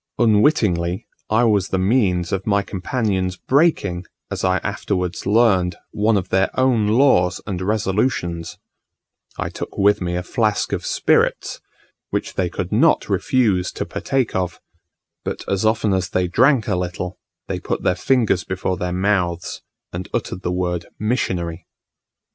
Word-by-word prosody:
Unwittingly, 105 - +2 0.2
I 110 +3 +3
was 105 -5 +3
the 95 - -1
means 95 -4 +1
of 95 +1 -2
my 100 -1 +2
companions 95 -2 -2
breaking, 115 - +1 0.3
as - - -3
I 95 -1 +3
afterwards 95 -2 -2
learned, 100 -5 +3 0.2
one 105 +1 +2
of 95 -1 -3
their 95 +1 +2
own 125 -5 +3
laws, 105 -7 +3
and 95 -3 -4
resolutions: 95 -4 -1 0.8
I - - -2
took - - -7
with 100 0 +3
me 90 -1 -2
a 90 - -2
flask 105 +2 0
of - - -2
spirits, - - +1 0.5
which - - -3
they 90 -2 0
could - - -4
not - - +3
refuse 105 -8 +1
to - - -3
partake 130 -4 -1
of; 90 -2 -2 0.6
but - - -5
as 100 +2 +1
often 110 -2 +1
as 95 -1 0
they 90 -2 0
drank 125 +5 +3
a - - +1
little, 90 0 -4 0.3
they - - -3
put - - -3
their - - +3
fingers 105 -1 +1
before 95 0 -2
their 90 0 -2
mouths, 90 -3 -1 0.3
and 90 +1 -5
uttered 90 - -3
the 90 - -2
word 90 -2 -2
"Missionary." 90 -7 -2
95 Hz, 150 wpm, -21 LUFS, 90-110 Hz, 0.8 s, I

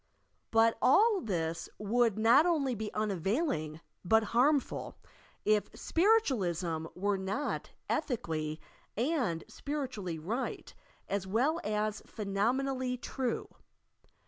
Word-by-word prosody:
But 225 0 +4
all 415 - +5
this 165 - -2
would 225 +1 +2
not 240 +9 +6
only 290 -7 +1
be 220 -1 -4
unavailing, 195 - -1 0.2
but 220 +5 +4
harmful, 275 +4 +2 0.5
if 215 -1 +2
Spiritualism 190 - +1
were 200 +1 0
not 200 +10 -2 0.2
ethically 160 - -2 0.4
and 240 - 0
spiritually 255 - -4
right 215 +12 -4 0.3
as 195 -1 -2
well 260 - +1
as 210 0 -1
phenomen 215 +6 0
ally 260 -2 -1
true. 250 0 -3
220 Hz, 100 wpm, -32 LUFS, 190-270 Hz, 0.5 s, not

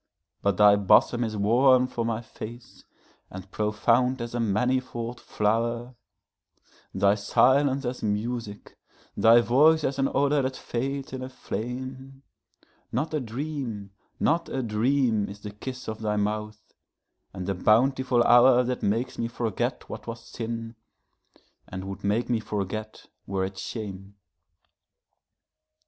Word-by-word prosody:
But 100 -2 +1
thy 105 -1 +7
bosom 110 +4 +4
is 110 -2 -3
warm 125 +5 +4
for 120 -2 -3
my 115 0 -2
face 115 +1 -10 0.4
and 95 +1 -10
profound 115 +5 +1
as 115 0 -5
a 120 - -2
manifold 120 +2 -1
flower, 115 +3 -1 1.0
Thy 100 0 +3
silence 130 +6 +2
as 125 +1 -4
music, 105 0 -4 0.4
thy 115 +1 +6
voice 150 +7 +4
as 140 0 -1
an 135 - +2
odor 140 +1 +2
that 130 0 -3
fades 135 +3 -4
in 130 - -5
a 130 - -5
flame; 130 +2 -6 0.7
Not 150 +7 -2
a 155 - +1
dream, 120 -5 -5 0.3
not 165 +2 +1
a 130 - -2
dream 115 -1 +1
is 100 +1 -10
the 105 - -7
kiss 130 +5 -8
of 110 0 -5
thy 105 -1 -1
mouth, 105 +1 -3 0.6
and 95 -1 -6
the 100 - -1
bountiful 125 +5 +3
hourThat 125 +1 +5
makes 115 +5 -1
me 115 - 0
forget 120 +1 -3
what - - -8
was 115 0 -7
sin, 115 0 -5 0.9
and 95 0 -6
would 95 +1 -7
make 105 +4 0
me 120 -2 +1
forget 110 0 -5 0.2
were 95 -1 -1
it 95 0 -7
shame. 100 -3 -7
115 Hz, 135 wpm, -26 LUFS, 105-130 Hz, 1.0 s, thy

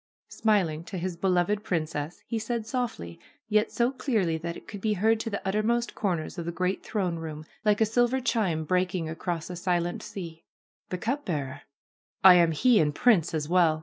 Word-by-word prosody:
Smiling 180 -8 +1
to 190 - -6
his 180 0 -3
beloved 185 +3 +1
princess, 155 -4 -3
he 230 - -2
said 230 0 -3
softly 220 - -4 0.3
yet 215 0 +2
so 240 +1 +1
clearly 220 - 0
that 170 +1 -4
it - - -14
could 205 -3 -8
be 215 0 +1
heard 220 +3 +2
to 225 - -3
the 200 -2 -4
uttermost 225 +4 0
corners 175 -4 -2
of 170 - -4
the 170 - -2
great 185 +2 -1
throne 185 -6 -2
room 155 -1 -6 0.2
like 210 0 +2
a - - +6
silver 240 +4 +2
chime 210 -10 0
breaking 180 0 0
across 165 0 -3
a - - -5
silent 175 -1 -1
sea: 180 -6 -8 0.5
^^The 185 - -3
cup 270 +8 -2
bearer! 145 -5 -3 0.6
I 190 -1 +11
am 170 -2 +5
he 235 +9 +4
and 150 -2 +1
prince 180 -10 +3
as 150 -2 -2
well. 170 -2 +3
185 Hz, 190 wpm, -27 LUFS, 165-220 Hz, 0.6 s, I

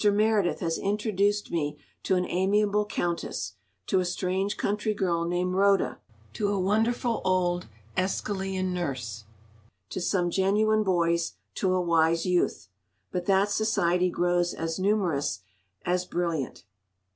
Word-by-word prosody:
Meredith 210 -2 +3
has 165 -2 -1
introduced 205 0 0
me 150 -3 -1 0.2
to 190 - +1
an 180 0 +1
amiable 205 +3 +2
Countess, 170 - -2 0.3
to 190 - +2
a - - +1
strange 185 +3 -1
country 210 +1 -1
girl 170 -4 0
named 180 +1 0
Rhoda, 195 -9 +3 0.3
to 205 - -1
a 200 -1 0
wonderful 225 +5 +1
old 180 -1 +1 0.3
Æschylean 190 0 -1
nurse, 130 -11 -4 0.7
to - - -3
some 175 -1 +1
genuine 210 +3 +3
boys, 170 -4 +1 0.2
to 190 - 0
a - - +2
wise 165 -1 +2
Youth,—but 180 0 -3
that 195 +1 +3
society 180 -4 +2
grows 175 0 +1
as 165 +2 -3
numerous 175 - +1 0.4
as 180 0 +1
brilliant. 165 - -2
185 Hz, 125 wpm, -27 LUFS, 170-200 Hz, 0.7 s, Meredith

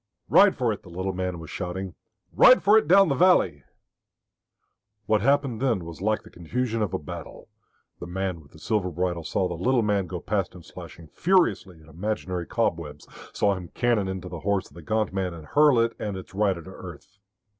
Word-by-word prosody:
"Ride - - +6
for - - +1
it!" - - -9
the - - -15
little 95 +2 -3
man 90 -1 -3
was 80 -2 -10
shouting. 95 0 -5 0.4
"Ride 255 - +7
for 205 +2 +5
it 220 - +4
down 195 +1 +6
the - - +2
valley." 125 - +3 1.4
What 110 0 +2
happened 135 -2 +1
then 115 -10 0
was 85 +1 -9
like 110 +2 0
the - - -15
confusion 115 +6 -3
of 105 -4 -1
a - - +1
battle. 85 +1 -9 0.5
The 85 - -7
man 90 -1 -3
with 70 - -20
the - - -14
silver 100 +2 -1
bridle 90 0 -2
saw 90 +4 -1
the 90 - -5
little 120 +8 +1
man 100 -3 0
go 90 0 -5
past 95 0 -2
him 90 - -12
slashing 85 0 -11
furiously 110 - +1
at - - -19
imaginary 90 0 -4
cobwebs, 80 -10 -2 0.2
saw 100 - +1
him 90 -2 -7
cannon 120 -5 +1
into 95 -1 -5
the 85 -2 -7
horse 100 +3 -1
of - - -22
the 85 - -11
gaunt 110 +3 -1
man 95 -3 -2
and 80 -2 -11
hurl 145 - +4
it 115 0 +1
and 105 -3 -4
its 95 - -11
rider 95 -4 0
to - - -11
earth. 100 +1 -12
95 Hz, 205 wpm, -25 LUFS, 85-110 Hz, 1.4 s, Ride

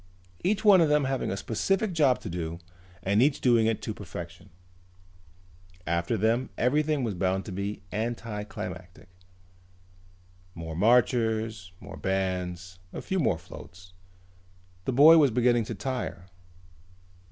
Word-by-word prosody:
Each 205 +3 0
one 195 -4 +7
of 160 - +3
them 150 -1 +3
having 135 -1 -1
a 95 - -3
specific 190 - -1
job 145 -6 +3
to - - -6
do 85 -1 -4 0.5
and 100 +3 +2
each 140 +2 +3
doing 115 -3 +3
it 115 -2 -1
to 110 - -3
perfection. 85 -2 -9 1.4
After 85 +7 -1
them 115 +5 +1
everything 150 +2 +1
was 115 -4 -1
bound 95 +1 -1
to 105 - -7
be 100 +2 -4
anticlimactic. 105 -6 -6 1.5
More 80 -1 -6
marchers, 110 -2 +1
more - - -10
bands, 90 -1 -3
a - - -6
few 190 - -2
more 105 - +1
floats. 90 +3 -13 0.9
The - - 0
boy 155 +6 +8
was 145 -3 +5
beginning 120 -1 +2
to - - -5
tire. 125 -8 -4
110 Hz, 130 wpm, -27 LUFS, 90-130 Hz, 1.5 s, boy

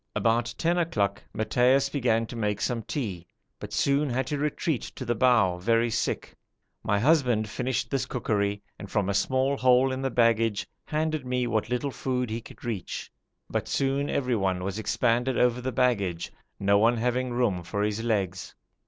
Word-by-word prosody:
About 120 +1 +1
ten 170 +2 +1
o'clock 100 - 0
Matthaios 125 +5 +2
began 120 -5 +1
to 115 - -9
make 105 -3 -1
some 120 +1 -1
tea, 100 - -4 0.3
but - - -8
soon 140 +1 +2
had 130 +1 0
to 145 +2 -3
retreat 150 -1 -1
to 130 - -6
the 120 - +1
bow 115 -7 +3
very 115 +4 +2
sick. 115 - -2 0.5
My 100 - +1
husband 125 -5 +3
finished 125 +3 -2
this 135 -2 0
cookery, 100 -5 -1 0.2
and 100 - -8
from 100 -1 0
a - - +1
small 130 +7 +1
hole 130 +1 +4
in 130 0 -3
the 135 - 0
baggage 115 -3 +2 0.2
handed 155 -1 -1
me 125 -1 -1
what 110 -3 -1
little 125 +3 -1
food 125 -3 -2
he 115 +1 -3
could 115 - -13
reach, 110 -6 -4 0.4
but - - -2
soon 140 +1 0
everyone 95 -9 0
was 100 +3 -3
expanded 120 +3 +1
over 125 0 +2
the 130 +1 -2
baggage, 100 -9 0 0.3
no 100 0 +3
one 115 +3 +4
having 125 +2 0
room 120 -7 +1
for 100 +4 -2
his 105 +1 -1
legs. 95 -5 -2
120 Hz, 175 wpm, -27 LUFS, 105-130 Hz, 0.5 s, hole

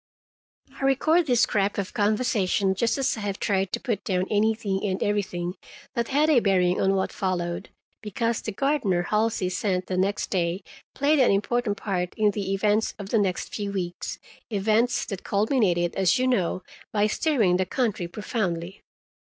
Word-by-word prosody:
I - - -5
record 310 +5 +3
this 245 -3 +3
scrap 205 -2 +1
of 200 -1 -3
conversation, 205 -3 +1
just 230 +5 0
as 270 - +1
I - - -5
have 205 -2 -3
tried 195 -2 0
to - - -2
put 225 -6 -2
down 185 -1 0
anything 210 -2 +1
and 190 -2 -1
everything 180 -4 -1 0.4
that 235 -3 -1
had 290 +3 +2
a 300 -5 +5
bearing 185 -4 +2
on 195 0 +3
what 190 - 0
followed, 175 -3 -2 0.3
because 230 +2 -1
the 215 - -4
gardener 210 -7 +1
Halsey 215 0 0
sent 185 0 -1
the 185 - -3
next 195 +2 0
day 180 0 0 0.3
played 290 +2 +3
an 255 - +5
important 205 +1 0
part 180 -3 -3
in 210 -1 +3
the 195 -2 -3
events 210 +2 +1
of 200 -2 -8
the 225 - +2
next 190 -3 -1
few 205 -2 -3
weeks—events 205 +5 -2
that 195 -4 -6
culminated, 200 -5 +1
as 190 -3 +3
you 255 - +1
know, 185 -7 0 0.3
by 210 -1 +2
stirring 215 - +2
the 185 0 0
country 225 -9 -1
profoundly. 185 -2 -3
205 Hz, 165 wpm, -25 LUFS, 185-230 Hz, 0.4 s, a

